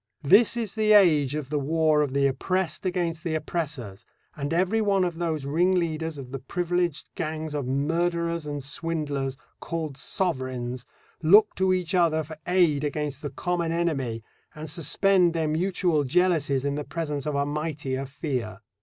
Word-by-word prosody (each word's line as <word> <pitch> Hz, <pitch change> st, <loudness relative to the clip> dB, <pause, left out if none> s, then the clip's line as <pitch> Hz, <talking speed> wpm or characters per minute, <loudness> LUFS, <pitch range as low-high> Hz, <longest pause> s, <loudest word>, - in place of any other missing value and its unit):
This 205 Hz, +10 st, +5 dB
is 225 Hz, -5 st, -2 dB
the 215 Hz, -1 st, +3 dB
age 155 Hz, -9 st, +5 dB
of 150 Hz, -2 st, -5 dB
the 150 Hz, -, +1 dB
war 155 Hz, +1 st, +2 dB
of 145 Hz, -3 st, 0 dB
the 140 Hz, 0 st, +2 dB
oppressed 185 Hz, +7 st, -1 dB
against 175 Hz, -2 st, -2 dB
the 165 Hz, -3 st, -1 dB
oppressors, 145 Hz, -, -4 dB, 0.3 s
and 145 Hz, -2 st, -4 dB
every 185 Hz, +6 st, +2 dB
one 200 Hz, -3 st, +2 dB
of 175 Hz, -2 st, -2 dB
those 160 Hz, -5 st, -2 dB
ringleaders 165 Hz, 0 st, 0 dB
of 130 Hz, -2 st, -8 dB
the 135 Hz, -, -4 dB
privileged 175 Hz, +3 st, -2 dB
gangs 155 Hz, 0 st, -4 dB
of 145 Hz, -4 st, -2 dB
murderers 170 Hz, +3 st, 0 dB
and 145 Hz, -2 st, -4 dB
swindlers, 145 Hz, -3 st, -2 dB, 0.2 s
called 160 Hz, -5 st, -4 dB
Sovereigns, 130 Hz, -8 st, -3 dB, 0.3 s
look 200 Hz, +7 st, +6 dB
to 190 Hz, 0 st, +1 dB
each 185 Hz, -1 st, 0 dB
other 165 Hz, -3 st, +3 dB
for 155 Hz, +1 st, -10 dB
aid 175 Hz, -6 st, +3 dB
against 145 Hz, -1 st, -3 dB
the 145 Hz, -, -4 dB
common 170 Hz, +4 st, -2 dB
enemy, 135 Hz, -10 st, -1 dB, 0.3 s
and 155 Hz, -1 st, -6 dB
suspend 180 Hz, +2 st, +3 dB
their 165 Hz, -2 st, 0 dB
mutual 170 Hz, -1 st, +1 dB
jealousies 145 Hz, -3 st, +1 dB
in 140 Hz, -, 0 dB
the 145 Hz, +1 st, -3 dB
presence 150 Hz, -2 st, -4 dB
of 150 Hz, -, -1 dB
a 140 Hz, 0 st, +1 dB
mightier 145 Hz, -3 st, -3 dB
fear. 125 Hz, -, -4 dB
155 Hz, 165 wpm, -26 LUFS, 140-175 Hz, 0.3 s, look